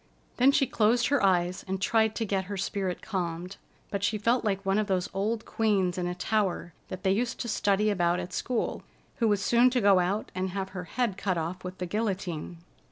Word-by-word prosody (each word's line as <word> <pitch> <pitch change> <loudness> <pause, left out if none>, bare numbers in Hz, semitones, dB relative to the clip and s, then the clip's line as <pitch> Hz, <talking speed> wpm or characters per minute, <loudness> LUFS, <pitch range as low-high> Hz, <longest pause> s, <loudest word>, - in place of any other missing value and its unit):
Then 255 +3 +6
she 280 -1 +3
closed 235 -1 +2
her 285 -6 +2
eyes 185 -1 +2
and 190 0 -2
tried 220 +2 +2
to 225 - -1
get 195 -2 -1
her 200 +1 -5
spirit 190 -1 -2
calmed, 180 -1 -4 0.3
but 200 -1 -2
she 215 +1 +1
felt 230 +4 +1
like 195 -2 -1
one 195 +2 +2
of 215 - 0
those 185 -2 -1
old 215 +4 -1
queens 195 -5 +1
in 180 -1 -2
a 180 - -3
tower 190 -3 -1
that 185 +1 -7
they 190 - +3
used 230 +4 -1
to 235 - -3
study 210 -1 +2
about 175 -2 +1
at 180 0 -6
school: 245 +5 -2 0.4
who 230 - +2
was 205 -2 +1
soon 240 +1 +5
to 250 0 +1
go 200 -4 +5
out 190 +4 -1
and 185 +1 -2
have 190 +1 -4
her 180 -2 -6
head 235 -2 -1
cut 190 -3 -1
off 170 +3 -4
with 185 0 -6
the 180 - -3
guillotine. 185 -4 -3
195 Hz, 220 wpm, -28 LUFS, 180-220 Hz, 0.4 s, Then